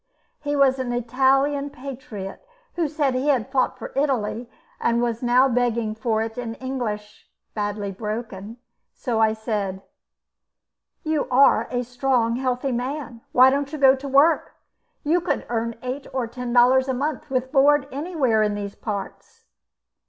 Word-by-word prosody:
He 290 0 -2
was 270 -2 +3
an 255 -2 -2
Italian 270 +4 +2
patriot, 255 - -8 0.3
who 340 -3 0
said 290 -3 0
he 255 +3 -1
had 265 -3 +1
fought 260 -2 +1
for - - -8
Italy; 250 -4 -1 0.3
he 235 - +3
was 235 -1 0
now 250 +2 +4
begging 235 -3 0
for 220 -1 0
it 225 +2 -6
in 230 -2 -4
English, 230 -6 -5 0.2
badly 205 -1 -3
broken, 215 +1 -6 0.4
so 235 -3 -2
I 220 -1 +4
said: 205 -4 -3 1.2
"You 310 -2 0
are 265 +2 +5
a 245 0 -1
strong, 245 -1 0
healthy 255 +1 -1
man; 245 -1 -4
why 255 +1 +7
don't 280 +1 -1
you 310 - -4
go 270 -2 +6
to 275 +1 -7
work? 280 +5 +3 0.5
You 335 +4 +2
could 345 - -1
earn 230 0 -2
eight 260 +2 -4
or 260 -2 0
ten 245 +1 -6
dollars 255 +2 +5
a 260 - 0
month, 295 +3 -3
with 260 -1 -1
board, 285 0 +4
anywhere 275 -7 0
in 210 -1 +1
these 200 -1 -5
parts." 205 -2 -7
250 Hz, 155 wpm, -23 LUFS, 225-275 Hz, 1.2 s, why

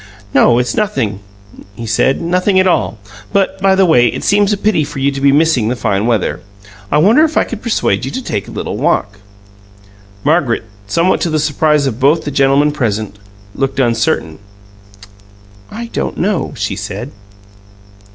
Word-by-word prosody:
"No, 120 -3 +4
it's 125 -1 0
nothing," 130 - -1 0.6
he 115 - -7
said. 110 +5 +1
"Nothing 180 +3 +1
at 185 - +3
all. 180 -10 +1 0.3
But, 195 -1 0
by 195 0 +4
the 190 0 +4
way, 125 -8 +4
it - - -4
seems 205 0 +2
a 205 - +1
pity 205 -6 +1
for 145 0 -7
you 135 +1 +1
to 135 0 -5
be 140 0 +4
missing 145 -6 +2
the 125 - -1
fine 105 -2 -1
weather. 100 -9 0 0.5
I 150 - +3
wonder 215 - +5
if 315 -1 0
I - - +4
could 230 -2 -7
persuade 235 -3 0
you - - -3
to 260 +2 -5
take 100 - -3
a - - -9
little - - -5
walk?" 100 -1 -1 1.0
Margaret, 145 -5 +1 0.2
somewhat 170 - +1
to 170 - 0
the 155 - 0
surprise 150 -1 +1
of 125 -3 -3
both 150 +5 +3
the 145 - -3
gentlemen 140 +2 +3
present, 110 -7 -3 0.3
looked 135 -1 -2
uncertain. 115 -10 0 1.3
"I 235 +2 -6
don't - - -3
know," 195 0 -1
she - - -3
said. - - -6
145 Hz, 175 wpm, -15 LUFS, 120-185 Hz, 1.3 s, wonder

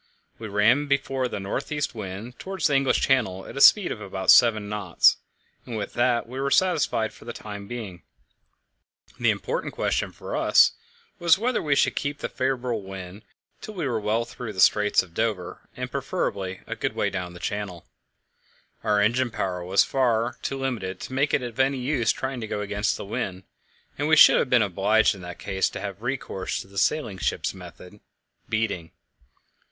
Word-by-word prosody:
We 110 - -6
ran 110 +8 +3
before 135 -2 0
the 120 - -5
north 100 +10 -4
east 145 -1 -1
wind 105 +3 -7
towards 190 -3 -4
the 145 - +3
English 135 -1 +2
Channel 95 -8 +1
at - - -10
a 135 - -2
speed 200 +3 +7
of 105 - -5
about 95 -1 +2
seven 110 -4 +5
knots, 105 -4 +3 0.5
and 115 -3 -6
with 105 - -5
that 120 -1 +2
we 130 +3 -7
were 140 +1 0
satisfied 150 -8 +2
for - - -16
the 120 - -6
time 100 -2 -8
being. 105 -8 -7 1.2
The - - +3
important - - -2
question - - -1
for - - -7
us - - +5 0.5
was 170 +1 +5
whether 245 +5 0
we 145 -3 +1
should - - +2
keep 145 0 -2
the - - -4
favourable 125 -4 -1
wind 95 0 -9 0.4
till 215 - -8
we 165 -6 -2
were 120 -4 -1
well 110 +2 0
through 120 -2 -7
the 95 - -7
Straits 105 +1 +4
of 90 -2 -17
Dover, 105 -4 -3
and, - - -5
preferably, 95 -1 -3
a - - -5
good - - -3
way - - 0
down 90 -2 -5
Channel. 100 -2 -5 1.0
Our 105 -1 +2
engine 120 +4 +2
power 90 -5 -3
was 95 +3 +4
far 120 -2 +1
too 135 - -3
limited 110 -9 -3
to - - -7
make 140 +2 +1
it 125 - +1
of 120 0 -7
any 135 +1 +2
use 125 -2 +1
trying 130 -2 -4
to 110 - -4
go 105 - -3
against 105 +1 -1
the - - -7
wind, 95 -2 -4 0.6
and 145 - 0
we 160 - +5
should - - +8
have - - 0
been 125 -3 +5
obliged 105 +3 +3
in 95 - -11
that 90 0 -8
case 95 -1 -1
to - - -7
have 100 0 -6
recourse 125 -6 -3
to - - -13
the 100 0 -4
sailing 110 -10 0
ship's - - -1
method 90 +2 -12 0.5
beating. 110 -7 -2
110 Hz, 190 wpm, -25 LUFS, 100-130 Hz, 1.2 s, should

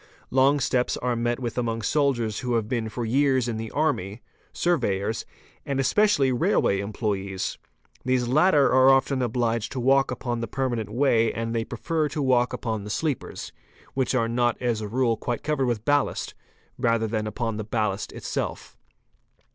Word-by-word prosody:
Long 135 +3 +4
steps 125 -1 0
are 125 -1 -1
met 120 +1 -1
vith 120 -1 -3
among 115 -2 -2
soldiers 120 -5 +1
who 125 -2 -1
have 110 -2 0
been 115 -2 -2
for 120 +2 -4
years 130 +1 +2
in 115 -2 -2
the 110 0 -5
army, 120 -9 -1 0.3
surveyors, 110 - 0 0.4
and 135 -1 -1
specially 205 -7 +3
railway 110 -5 +2
employés. 100 -2 -3 0.5
These 130 -1 +1
latter 150 +2 +4
are 130 +1 +6
often 135 0 +3
obliged 115 -2 -1
to 130 - -3
walk 135 +2 +3
upon 120 -1 -3
the 115 - -3
permanent 120 -3 -2
way 115 -1 +2
and 115 0 -3
they 115 -1 0
prefer 155 +7 -2
to 150 - -3
walk 125 -2 +3
upon 110 -3 -3
the 105 - -7
sleepers, 145 +5 -3 0.4
which 130 -1 0
'are 115 -3 +2
not 120 0 +1
as 120 -3 -1
a 105 - -4
rule 115 +1 +1
quite 120 0 -3
covered 145 -4 0
with 115 -3 -2
ballast, 145 -1 +1 0.5
rather 115 -2 +2
than 110 -1 -2
upon 115 -1 -3
the 110 - -3
ballast 105 -2 -2
tself. - - -4
120 Hz, 170 wpm, -25 LUFS, 110-135 Hz, 0.5 s, are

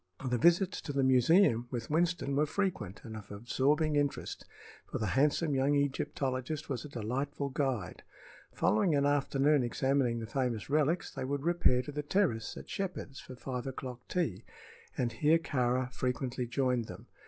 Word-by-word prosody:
The 125 -2 0
visits 175 - +3
to 145 - -5
the 140 -1 +1
museum 130 - +4
with 120 +1 -5
Winston 165 -3 +1
were 150 +2 +2
frequent 145 - -2
and 110 -1 -8
of 105 -2 -9
absorbing 140 +8 +1
interest, 145 -1 -1 0.4
for - - -3
the 110 - -1
handsome 150 +3 +2
young 135 +2 +2
Egyptologist 140 0 -1
was 130 -4 -2
a 150 - -8
delightful 135 +4 -3
guide. 130 -5 -2 0.5
Following 125 - +2
an 140 0 +2
afternoon 145 0 +3
examining 125 0 +1
the 115 - -4
famous 125 0 -2
relics, 155 +3 +1
they - - -4
would 140 +1 -2
repair 170 -7 +3
to 145 - -7
the 150 +1 -3
terrace 145 - 0
at - - -9
Shepheard's 180 -8 -4
for 130 - -10
five 125 0 -5
o'clock 125 -2 -7
tea, 120 - -1 0.5
and 120 -2 0
here 155 +5 +3
Kāra 130 -4 0
frequently 125 0 -2
joined 125 -1 0
them. - - -10
135 Hz, 165 wpm, -32 LUFS, 125-150 Hz, 0.5 s, museum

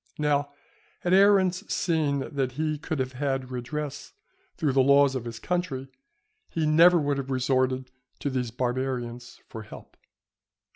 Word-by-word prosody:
Now, 145 -1 +1 0.5
had 180 - +1
Aruns 190 -1 +4
seen 150 -5 0
that 135 -3 -1
he 155 +1 -2
could 160 0 -3
have 130 -1 -2
had 135 -1 -2
redress 145 +4 -5 0.4
through 150 -3 +1
the 135 - +4
laws 140 +1 +5
of 130 -3 -4
his 115 -1 -6
country, 140 -5 -3 0.6
he 160 -1 -1
never 170 +4 +6
would 145 -3 0
have 135 0 -5
resorted 130 0 0 0.3
to 140 - -3
these 125 -2 -1
Barbarians 125 0 -3
for 110 - -8
help. 110 - -12
140 Hz, 145 wpm, -26 LUFS, 130-155 Hz, 0.6 s, never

